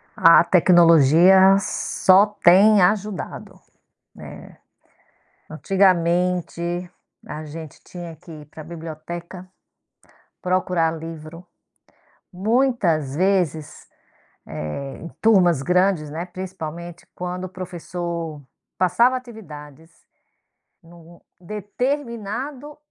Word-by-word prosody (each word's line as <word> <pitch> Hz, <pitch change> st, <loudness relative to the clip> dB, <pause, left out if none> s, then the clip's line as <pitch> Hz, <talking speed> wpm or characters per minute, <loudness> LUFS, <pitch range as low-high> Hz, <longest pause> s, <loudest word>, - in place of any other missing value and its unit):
A 165 Hz, -3 st, +6 dB
tecnologia 175 Hz, +2 st, +5 dB
só 190 Hz, 0 st, +2 dB
tem 205 Hz, 0 st, +4 dB
ajudado, 205 Hz, +1 st, -2 dB, 0.6 s
né. -, -, -12 dB, 0.9 s
Antigamente 175 Hz, 0 st, 0 dB, 0.3 s
a 155 Hz, +1 st, -7 dB
gente 155 Hz, 0 st, -10 dB
tinha 175 Hz, -2 st, -9 dB
que 170 Hz, +2 st, -15 dB
ir 150 Hz, -2 st, -11 dB
pra 155 Hz, +1 st, -11 dB
biblioteca 170 Hz, +3 st, -9 dB, 0.9 s
procurar 180 Hz, -3 st, 0 dB
livro, 165 Hz, +1 st, -10 dB, 0.9 s
muitas 195 Hz, -, 0 dB
vezes, 175 Hz, -4 st, -1 dB, 0.6 s
eh, 75 Hz, -, -6 dB
em 170 Hz, -, -9 dB
turmas 180 Hz, -9 st, +4 dB
grandes, 180 Hz, -1 st, +1 dB
né, 165 Hz, +4 st, -5 dB
principalmente 175 Hz, -2 st, -8 dB
quando 180 Hz, +1 st, -6 dB
o -, -, -8 dB
professor 170 Hz, -3 st, -6 dB, 0.4 s
passava 235 Hz, +8 st, +3 dB
atividades 165 Hz, -, -11 dB, 0.9 s
no 170 Hz, 0 st, -17 dB, 0.2 s
determinado 245 Hz, -, -5 dB
175 Hz, 80 wpm, -21 LUFS, 165-195 Hz, 0.9 s, A